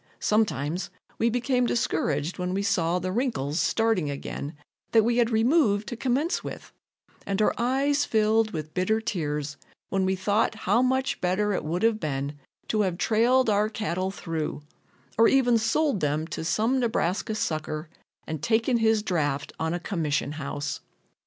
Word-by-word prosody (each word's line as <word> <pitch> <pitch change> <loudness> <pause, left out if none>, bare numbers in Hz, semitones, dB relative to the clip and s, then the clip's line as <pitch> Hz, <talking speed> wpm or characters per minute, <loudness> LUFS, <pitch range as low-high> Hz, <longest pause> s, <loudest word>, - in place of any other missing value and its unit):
Sometimes 175 -6 0 0.3
we 230 - +3
became 245 +1 +1
discouraged 160 -8 -1
when 180 +1 -1
we 200 - 0
saw 170 -3 +1
the 185 +1 -2
wrinkles 190 - -1
starting 215 -1 +1
again 140 +1 -5 0.4
that 225 -1 +6
we 235 +2 +1
had 235 -2 +3
removed 220 -3 +3
to 240 - -4
commence 265 - 0
with, - - -8 0.5
and 195 0 -2
our 215 - +3
eyes 275 +4 +1
filled 220 -2 +2
with 155 -4 -6
bitter 200 +5 +1
tears 150 -9 -3 0.3
when 195 -1 +1
we 190 0 +1
thought 205 +4 +1
how 235 - +4
much 260 +1 0
better 200 +3 +1
it - - -2
would 170 +6 -2
have 225 -1 +3
been 140 -3 -2 0.4
to 215 - +2
have 185 -4 0
trailed 240 +6 +3
our 210 0 +2
cattle 190 -4 -2
through, 165 -6 -4 0.6
or 230 - +7
even 245 -4 +4
sold 265 +2 +1
them 150 +1 0
to 165 - -5
some 225 +10 +1
Nebraska 220 -3 0
sucker 155 -4 -2 0.4
and 155 -2 -5
taken 230 +2 +2
his 220 -2 +2
draft 145 -7 -1
on 160 0 -1
a 175 - -1
commission 160 -6 -1
house. 145 -1 -4
205 Hz, 160 wpm, -26 LUFS, 160-230 Hz, 0.6 s, or